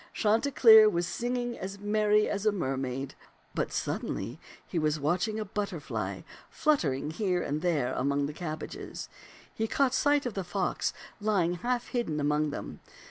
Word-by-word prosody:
Chanticleer 220 -1 +6
was 175 -3 0
singing 245 +4 -2
as 195 +2 -5
merry 210 +1 +2
as 205 +1 -1
a - - +6
mermaid; 135 -6 -3 0.4
but - - -1
suddenly, 95 - -2
while 140 +8 -15
he 175 - -2
was 155 0 +1
watching 180 +9 0
a 215 - -2
butterfly 200 -6 -4 0.3
flut 305 -2 +2
tering 145 +1 -2
here 180 -1 0
and 150 +2 -2
there 160 -8 +1
above 140 +2 +1
the 145 - -4
cabbages, 155 -1 -6 0.4
he 220 - -1
caught 265 +2 +2
sight 290 0 +3
of 245 - -2
the 195 - -3
fox 180 +1 -1 0.3
lying 200 -5 +1
half 245 +5 -1
hidden 230 -12 -1
among 150 +1 +1
them. - - -6
190 Hz, 160 wpm, -29 LUFS, 150-220 Hz, 0.4 s, Chanticleer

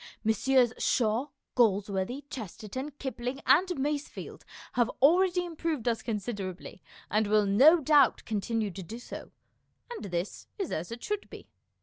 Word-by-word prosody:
Messrs. 240 +2 +3
Shaw, 235 +2 +1 0.3
Galsworthy, 205 +2 +1
Chesterton, 230 - -6
Kipling, 260 -1 -4
and 360 +6 +5
Masefield 290 +1 -4 0.3
have 240 -1 +2
already 355 +5 +4
improved 320 -7 -3
us 230 -1 +1
considerably, 200 -5 -5 0.3
and 215 +1 +2
will 210 0 +3
no 270 - +6
doubt 300 -1 +4
con 215 -3 -1
tinue 220 -3 -1
to 190 - -7
do 205 +6 -7
so, 245 - -9 0.6
and 475 - -6
this 175 0 -4
is 390 -5 -3
as 170 +7 -3
it 235 +1 -7
should 415 -1 -3
be. - - -12
240 Hz, 140 wpm, -29 LUFS, 210-290 Hz, 0.6 s, no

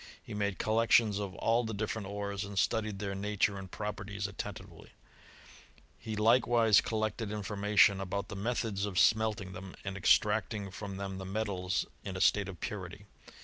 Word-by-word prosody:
He - - -8
made 100 -2 -1
collections 110 -1 +3
of 100 -2 -4
all 115 +3 +2
the 110 -2 -4
different 105 -1 -3
ores, 100 0 -3
and 100 0 -7
studied 110 +1 +1
their 100 0 -3
nature 100 0 0
and 95 -1 -8
properties 105 0 -4
attentively: 100 0 -7 1.1
he 110 -1 -5
likewise 115 0 +5
collected 110 -1 -2
information 105 -1 +3
about 100 +1 -3
the - - -7
methods 105 -1 -1
of 95 -3 -5
smelting 110 -3 +3
them, 95 +1 -9
and 95 -1 -3
extracting 105 +1 +2
from 100 +1 -6
them 95 -1 -5
the 95 - -6
metals 95 -2 -1 0.2
in 95 -1 -5
a - - -4
state 100 +1 +3
of 90 - -9
purity. - - -6
100 Hz, 160 wpm, -32 LUFS, 95-110 Hz, 1.1 s, likewise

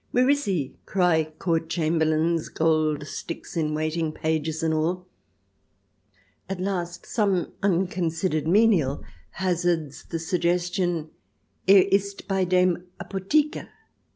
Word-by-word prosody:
" - - -43
Where 255 +3 +4
is 285 -2 +1
he 170 -10 -1
?" - - -41
cry 175 -4 +2
Court 165 -2 -1
Chamber 160 -1 +1
lains, 160 +1 +1
Gold 155 -2 +1
sticks 165 +3 -7
in 155 -2 0
Waiting, 155 +1 -1
pages, 160 0 -2
and 160 -1 +1
all. 170 +4 -1 1.4
At 195 -1 -3
last 180 -2 -3
some 200 -6 0
unconsidered 175 -4 0
menial 180 -8 +3 0.3
hazards 170 -5 -1
the 165 - -4
suggestion, 175 0 -1 0.3
" - - -15
Er 195 -1 +9
ist 200 0 0
bei 190 -2 +1
dem 180 0 +2
Apotheker 290 +11 0
170 Hz, 125 wpm, -25 LUFS, 160-190 Hz, 1.4 s, Er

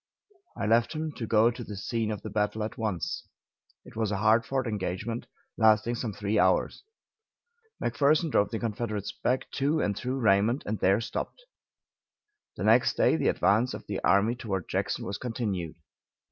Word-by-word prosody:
I - - -2
left 115 +5 +3
him 155 0 -3
to 120 -6 -6
go 115 +2 +4
to 120 +1 -7
the 105 - -7
scene 115 +3 -2
of 105 -2 -4
the 110 - -6
battle 105 +1 0
at 110 - -4
once. 105 -6 -3 0.6
It - - -14
was 110 -2 -1
a 100 - 0
hard 110 +3 +3
fought 135 -1 -1
engagement, 105 +2 -3 0.3
lasting 110 +1 +4
some 115 -1 -3
three 105 +1 -1
hours. 95 +1 +2 1.0
McPherson 150 +2 +2
drove 105 - +3
the 115 - -3
Confederates 110 -2 -3
back 130 +1 -2
to 145 +3 +1
and 100 -8 0
through 130 +5 -3
Raymond, 110 +2 +2
and 105 +1 -3
there 95 +4 +3
stopped. - - -5 1.1
The - - -4
next - - +4
day - - +3
the - - 0
advance 115 +5 +2
of - - -9
the 100 -2 -4
army 100 +4 +4
toward 100 -7 -4
Jackson - - -2
was 100 0 -4
continued. 100 -10 -3
110 Hz, 175 wpm, -28 LUFS, 105-120 Hz, 1.1 s, go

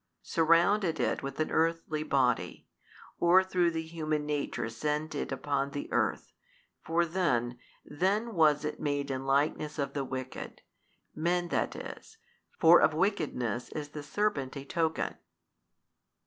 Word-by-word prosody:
surrounded 170 +3 +3
it - - 0
with 135 +1 -6
an 155 - 0
earthly 165 -1 0
Body, 130 -5 0 0.5
or 180 +2 +6
through 180 -2 +2
the 160 -1 -3
human 155 -2 -2
nature 145 -6 -2
sent 150 +7 -2
it 145 - -3
upon 140 +1 -1
the 145 0 -5
earth, - - 0 0.5
for 170 +1 +1
then, 125 -9 0 0.3
then 200 +9 0
was 150 -4 +3
it 150 - -4
made 145 -1 -1
in 135 0 -4
likeness 150 +2 +1
of 140 -2 -2
the 140 - -1
wicked, 130 -1 -6 0.5
men 175 +2 0
that - - -1
is, 445 - -9 0.4
for 170 +1 +7
of 155 - +3
wickedness 150 - -1
is 150 -1 -5
the 150 0 -7
serpent 145 -6 -1
a 140 - -7
token. 160 +1 -1
155 Hz, 140 wpm, -30 LUFS, 140-170 Hz, 0.5 s, for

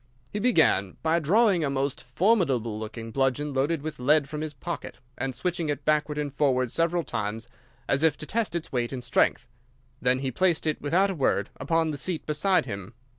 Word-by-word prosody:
"He 210 - -1
began 160 - +3
by 165 +1 +3
drawing 190 +2 +3
a 140 - 0
most 140 0 -1
formidable 130 - +1
looking 115 +1 -6
bludgeon 135 +3 0
loaded 140 +3 0
with 155 -3 -5
lead 145 +3 +3
from 150 +1 -5
his 155 -1 -3
pocket, 165 +5 -6 0.2
and 130 0 -3
switching 175 +3 -2
it 145 -3 -3
backward 150 -1 +1
and 145 -2 -3
forward 130 -4 +1
several 170 +1 +1
times, 110 -2 -4 0.4
as 135 - +2
if 160 -2 +3
to - - -6
test 220 0 -1
its 170 - -4
weight 120 -2 -1
and 130 -2 -5
strength. 125 -1 +2 0.6
Then 125 0 +3
he 130 0 -2
placed 175 +4 +1
it 155 -1 -1
without 185 +7 +2
a - - -2
word 145 -7 0
upon 165 -1 +1
the 145 - -5
seat 175 0 0
beside 170 +3 +2
him. 100 +2 -7
150 Hz, 195 wpm, -26 LUFS, 130-165 Hz, 0.6 s, began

